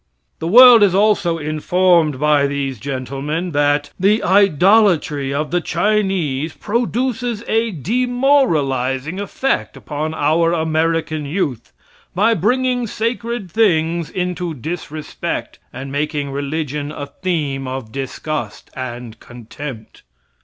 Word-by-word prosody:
The 160 - -3
world 240 +3 +9
is 195 -3 +4
also 200 -5 +2
informed 155 0 +1
by 150 -1 +3
these 140 -3 -3
gentlemen 140 - -4
that 145 0 +1
"the 205 +4 +2
idolatry 185 -6 +3
of 150 +2 -2
the 175 0 +1
Chinese 180 -9 0
produces 240 0 -2
a 225 +1 +1
demoralizing 180 - 0
effect 260 +6 -2
upon 155 +1 -4
our 165 +3 +2
American 160 -1 -1
youth 140 - -3 0.4
by 215 +5 +3
bringing 250 0 0
sacred 230 -3 -3
things 170 -6 +1
into 180 -2 -3
disrespect, 155 +2 -5
and 135 +2 -7
making 145 0 -2
religion 145 +1 -3
a 145 -1 -6
theme 140 -4 -3
of 130 -4 -6
disgust 135 -3 -5
and 120 -3 -7
contempt." 120 0 -10
160 Hz, 110 wpm, -18 LUFS, 140-200 Hz, 0.4 s, world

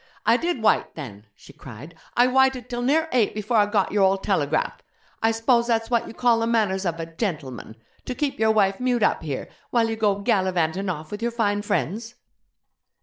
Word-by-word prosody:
'I 235 - +5
did 330 -6 -2
wyte 215 - +2
then!' 110 -9 -9
she - - -16
cried 135 +6 -11 0.2
'I 245 - +6
wyted 260 -1 +2
till 240 0 -3
near 310 +6 +2
eight 235 -5 +1
before 215 +2 -1
I 205 -1 +4
got 205 -2 0
your 205 0 +1
old 195 0 +3
telegraph! 155 -6 0 0.4
I 225 - +3
s'pose 235 +1 +2
that's 225 0 0
what 235 -1 +1
you - - -9
call 240 -2 +3
the 230 - 0
manners 200 -5 +1
of 165 -1 -3
a 165 - -3
"gentleman", 155 - -5 0.3
to 255 - -4
keep 285 -4 -2
your 220 0 +3
wife 200 -3 +2
mewed 250 -3 +1
up - - +2
here, 145 -4 -4 0.2
while 230 -2 +2
you - - -2
go 210 -3 +1
gallivantin' 190 -2 0
off 155 -3 -5
with 210 +1 -6
your 235 - 0
fine 205 -3 0
friends?' 210 +4 -2
215 Hz, 205 wpm, -24 LUFS, 185-235 Hz, 0.4 s, I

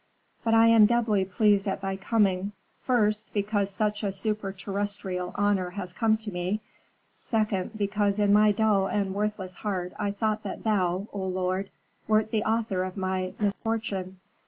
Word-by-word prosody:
But 225 0 +3
I 225 0 +7
am 225 -2 +7
doubly 220 -4 +2
pleased 200 +1 +2
at 195 - -2
thy 195 0 -2
coming; 195 -1 +1 0.3
first, 215 -4 +1
because 205 -1 0
such 210 +1 -1
a - - +1
superterrestrial 195 -2 -3
honor 200 -3 +1
has 180 -1 -6
come 220 +1 +2
to 210 - -4
me; 180 +3 -2 0.6
second, 215 -3 -1
because 205 0 0
in 205 -1 +3
my 210 0 +6
dull 205 -2 +2
and 195 -1 -1
worthless 200 -3 -3
heart 185 -4 -3
I 205 -1 0
thought 215 +1 -1
that - - -6
thou, 190 -2 +1
O 200 -2 -3
lord, 185 +1 -1 0.4
wert 215 0 +2
the 215 -1 +1
author 220 -4 0
of 185 +1 -6
my 185 -1 -2
misfortune. 205 -3 -2
205 Hz, 160 wpm, -27 LUFS, 190-215 Hz, 0.6 s, I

